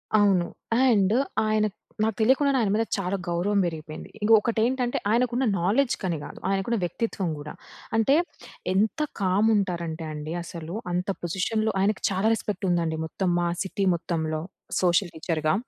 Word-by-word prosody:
అవును. 195 -4 +4 0.4
అండ్ 210 -5 +4 0.3
ఆయన 215 0 +2 0.4
నాకు 220 -2 +1
తెలియకుండానే 270 +4 +4
ఆయన 205 -3 +1
మీద 220 +2 +2
చాలా 195 0 -1
గౌరవం 185 +4 +1
బెరిగి‌పోయింది. 155 -2 -6
ఇంక 215 - +2
ఒకటి 225 +1 -1
ఏంటంటే, 245 0 0
ఆయనకు 240 +2 +2
ఉన్న 260 +2 +2 0.2
నాలెడ్జ్ 235 +9 +2
కని 175 -3 0
కాదు. - - -9
ఆయనకున్న 195 +4 0
వ్యక్తిత్వం 190 0 -2
కూడా. 150 +1 -7 0.4
అంటే 225 +6 +4 0.6
ఎంత 215 +10 +1 0.2
కామ్ 195 +3 +3
ఉంటారంటే 170 -5 -2
అండి 150 +1 -5
అసలు. 170 -1 -7 0.2
అంత 180 +2 -1
పొజిషన్‌లో 215 +6 0
ఆయనకి 200 +1 +1
చాలా 195 +3 +1
రెస్పెక్ట్ 210 -2 -3
ఉందండి 165 -2 +1
మొత్తం 185 +3 -2
మా 175 - +1
సిటీ 195 0 -1
మొత్తంలో 160 -2 -2 0.4
సోషల్ 175 0 +3
టీచర్‌గా. 155 -1 0
195 Hz, 150 wpm, -26 LUFS, 170-220 Hz, 0.6 s, అవును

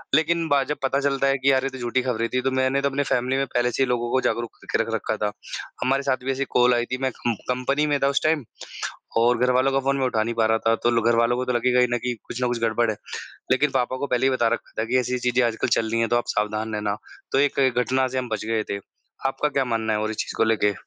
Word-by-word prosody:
लेकिन 165 +1 +2
बा 145 - +4
में 135 - 0
जब 150 - -2
पता 135 +1 +1
चलता 135 -1 +1
है 135 0 +2
कि 135 +1 +3
यार 130 0 +2
ये 135 - 0
तो 130 - -9
झूठी 120 +1 0
खबरें 115 -3 -1
थी, 125 - +2
तो 135 - 0
मैंने 130 +1 +1
तो 140 - +1
अपने 140 +1 -1
फ़ैमिली 130 +1 +1
में 135 - +1
पहले 120 0 +2
से 135 - +1
ही - - 0
लोगों 120 -1 -1
को 130 - +2
जागरूक 120 -1 -1
करके - - 0
रख - - -5
रखा - - -2
था। 105 - 0 0.5
हमारे 135 +2 +1
साथ 130 -2 0
भी 135 - +1
ऐसी 135 +1 -1
कॉल 125 0 +5
आई 120 0 0
थी, 130 - -3
मैं 130 -1 +1
कम 120 -1 0 0.2
कंपनी 135 +4 +1
में 145 -1 +1
था - - +5
उस 140 - 0
टाइम 155 -5 +1 0.8
और 120 +1 +4
घरवालों 130 +2 +3
का 135 - +2
फ़ोन 140 +1 0
मैं 130 - +1
उठा 110 -4 +1
नहीं 115 0 -3
पा 115 -1 +2
रहा 110 0 +3
था। 115 - +4
तो 120 - +3
ल - - -2
घर 115 - +3
वालों 115 +1 +2
को 130 - -1
तो 125 - -1
लगेगा 125 +1 +2
ही 125 - +4
ना 120 - +2
कि 125 - 0
कुछ 125 - -6
ना 125 - +2
कुछ 120 -1 -1
गड़बड़ 115 0 +1
है। 105 - -6 0.6
लेकिन 140 +3 +3
पापा 130 0 +1
को 140 - -2
पहले 125 +1 +1
ही - - +4
बता 120 -3 +2
रखा - - -9
था - - 0
कि 125 +3 +1
ऐसी 125 +1 -2
ऐसी 125 0 0
चीज़ें 125 +1 +2
आजकल 115 -1 -1
चल 110 -1 -1
रही 115 - +1
है 115 - +1
तो 120 - +2
आप 120 - +1
सावधान 105 +1 -1
रहना। 105 -1 -1 0.4
तो 135 - +3
एक 140 0 +2 0.2
घटना 130 +1 +2
से 130 0 -3
हम 125 - -3
बच 110 -1 -3
गए 110 -1 0
थे। 100 - -2 0.5
आपका 150 +2 0
क्या 135 -1 0
मानना 110 -2 -1
है 105 - +1
और 110 0 -1
इस 110 - -5
चीज़ - - -3
को - - +3
लेके? 105 -2 +2
125 Hz, 305 wpm, -24 LUFS, 115-135 Hz, 0.8 s, कॉल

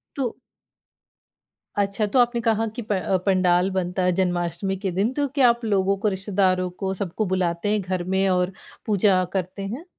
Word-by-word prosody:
तो 260 -5 -2 1.4
अच्छा 200 +1 +1
तो 260 - +5
आपने 240 0 +3
कहा 225 0 +2
कि 240 - -2
प 210 - -2
अ, 185 0 +1
पंडाल 185 -1 +3
बनता 185 0 -1
है 180 - +3
जन्माष्टमी 180 +1 -1
के 190 -1 -3
दिन, 195 +7 0
तो 285 +1 0
क्या 270 -2 +4
आप 235 0 0
लोगों 195 -2 +2
को, 215 +2 -1
रिश्तेदारों 190 -2 0
को, 190 +2 -4
सबको 195 +2 -3
बुलाते 185 0 -1
हैं 210 -1 +1
घर 185 -1 -2
में 190 +2 +1
और 180 0 +1 0.3
पूजा 195 -3 +3
करते 190 +1 -3
हैं? 255 - -6
190 Hz, 180 wpm, -23 LUFS, 185-215 Hz, 1.4 s, तो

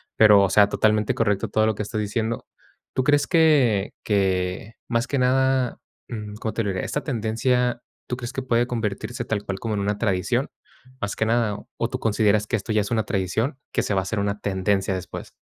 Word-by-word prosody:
pero 105 -2 +7
o 95 - +2
sea 105 -1 +5
totalmente 105 0 +2
correcto 105 -1 0
todo 110 +1 +2
lo 110 -1 +1
que 105 - -3
estás 105 +1 -4
diciendo. 110 +2 -2 0.5
¿Tú 130 - +1
crees 145 +1 +3
que 145 - +3
que 95 0 0
más 120 +1 0
que 140 - -1
nada?, 130 0 +2 0.3
mm, 105 -3 -6
¿cómo 110 0 -4
te 115 - -1
lo 105 - -1
diré? 95 -1 -2
Esta 150 - -2
tendencia, 120 0 0 0.3
¿tú 125 - -2
crees 120 0 -6
que 135 - -3
puede 120 -1 +1
convertirse 110 0 -3
tal 105 -2 -2
cual 95 -1 -4
como 110 0 -3
en 100 - -1
una 105 +1 -1
tradición 95 -5 0 0.5
más 100 0 -2
que 110 - 0
nada? 115 -2 +1 0.2
¿O - - -1
tú - - -3
consideras 105 -1 +2
que 115 - +1
esto 110 +2 -4
ya 105 - +3
es 105 - -5
una 110 -2 +2
tradición, 110 - -1
que - - 0
se 100 - -1
va 95 - +2
a - - -5
hacer 105 +3 -2
una 100 +1 -1
tendencia 95 0 0
después? 90 -1 -6
110 Hz, 215 wpm, -24 LUFS, 100-120 Hz, 0.5 s, pero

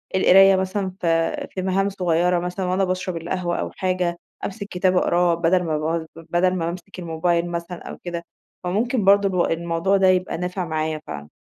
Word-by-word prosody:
القراية 195 +1 +7
مثلًا 190 +1 -1
في 165 -1 0
في 185 - -4
مهام 195 +1 +1
صغيرة، 180 -2 +1
مثلًا 180 +2 -3
وأنا 185 +2 +1
باشرَب 185 -1 -2
القهوة 175 +1 -2
أو - - -3
حاجة، 180 -2 -1 0.3
أمسِك 200 0 -5
كتاب 185 0 +1
أقراه، 175 -1 +3
بدَل 170 +2 +2
ما 155 -3 -1
باقعد 160 +1 -2
بدَل 175 +3 0
ما 165 -2 -1
بامسِك 180 +2 -6
الموبايل 170 +1 0
مثلًا 170 +1 -6
أو - - -7
كده. 170 -1 -4 0.4
فممكن 215 +4 0
برضه 195 -3 +4
ال - - -3
الموضوع 170 +3 +1
ده 190 -1 +4
يبقى 185 -2 +2
نافع 180 +1 -3
معايا 155 -1 -2
فعلًا. 75 0 -7
180 Hz, 180 wpm, -22 LUFS, 170-185 Hz, 0.4 s, القراية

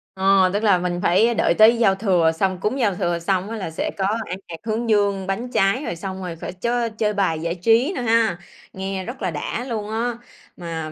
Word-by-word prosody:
Ờ. 190 -1 +4
Tức 205 +2 -1
là 205 -4 +5
mình 175 0 -2
phải 215 +7 +3
đợi - - +2
tới 220 +2 +6
giao 195 -5 +3
thừa, 185 -5 +2
xong 185 +3 -1
cúng 215 +8 -1
giao 205 -6 +1
thừa 175 -3 -1
xong 185 +3 -1
á 225 - -4
là 185 -6 -5
sẽ 160 - -3
có 190 - 0 0.2
ăn 180 - -5
hạt 170 - -7
hướng 225 +1 -2
dương, 200 -3 +1
bánh 230 +6 -3
trái, 200 +7 +2
rồi 170 - -3
xong 190 +2 -6
rồi 180 -2 -5
phải 165 - -7
chới 235 +4 -1
chơi 215 -1 -1
bài 190 -6 0
giải 170 +1 -2
trí 230 - +2
nữa - - -3
ha, 225 -5 +2 0.4
nghe 190 0 -4
rất 245 +2 -8
là 185 -3 -1
đã 160 +9 -4
luôn 215 -3 -3
á! 230 +2 -2 0.4
Mà 165 -3 -5
195 Hz, 230 wpm, -22 LUFS, 180-225 Hz, 0.4 s, tới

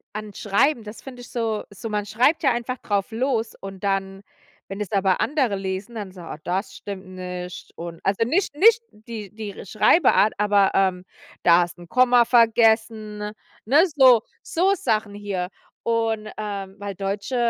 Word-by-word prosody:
an 215 -1 -5
Schreiben, 230 +5 +1
das 210 +1 -10
find 260 -2 -10
ich 245 - -11
so 225 -3 -2
so 205 +3 -7
man 210 -1 -2
schreibt 250 +10 +2
ja 270 - +4
einfach 240 +2 -3
drauf 200 -4 -1
los 230 -1 -1
und 195 -1 -9
dann 195 -1 -1 0.5
wenn 195 +1 -7
es 210 -3 -4
aber 195 -2 +2
andere 265 -8 +1
lesen, 195 +4 -5
dann 205 -4 -6
so: 185 -1 -12
„Oh, 165 - -7
das 185 +4 -2
stimmt 200 -2 -8
nicht“ 180 -1 -7
und 170 0 -7
also 195 +3 +1
nicht 310 - 0
nicht 455 +8 +5
die 215 -2 -9
die 215 -2 -7
R - - -8
Schreibart, 215 - +4
aber, 205 -1 +3
ähm: 185 -2 +2 0.4
„Da 170 0 +6
hast 175 0 -4
'n 175 -1 -13
Komma 245 -1 +5
vergessen, 225 -2 +3
ne?“ 210 0 -5 0.3
Ne, 285 +8 +5
so 260 -7 +6 0.2
so 375 +4 +2
Sachen 215 - -1
hier 195 -3 -3 0.3
und, 225 -2 -1
ähm 200 -2 -5
weil 200 -1 -5
deutsche 200 +5 -3
210 Hz, 175 wpm, -23 LUFS, 195-235 Hz, 0.5 s, Da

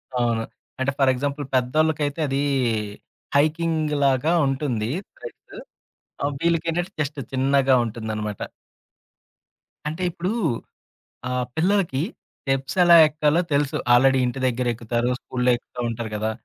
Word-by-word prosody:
అవును. 120 -2 +1 0.4
అంటే, 130 +1 +1
for 135 -2 +4
example 140 +2 -3
పెద్దోళ్ళకైతే 150 +3 +1
అదీ, 135 +1 0 0.9
హైకింగ్‌లాగా 155 -2 +2
ఉంటుంది. 130 -5 -1 0.3
త్రెడ్. 480 - -11 0.6
ఆ! - - 0 0.2
వీళ్ళకేంటంటే 170 +2 0
జస్ట్ 145 -1 -2
చిన్నగా 135 0 +3
ఉంటుందనమాట. 110 -2 -4 1.5
అంటే 160 +4 -3
ఇప్పుడు 180 +5 -3 1.0
ఆహ్, 125 0 -1
పిల్లలకి 170 -5 +1 0.4
స్టెప్స్ 135 0 -2
ఎలా 175 -1 +7
ఎక్కాలో 155 +2 +1
తెలుసు. 140 -1 +1 0.2
ఆల్రెడీ 130 +2 +5
ఇంటి 125 +2 -3
దగ్గరెక్కుతారు. 120 -1 -1
స్కూల్లో 125 0 0
ఎక్కుతా 125 +1 -13
ఉంటారు 115 -1 -4
గదా! 110 +1 -1
135 Hz, 105 wpm, -23 LUFS, 125-155 Hz, 1.5 s, ఎలా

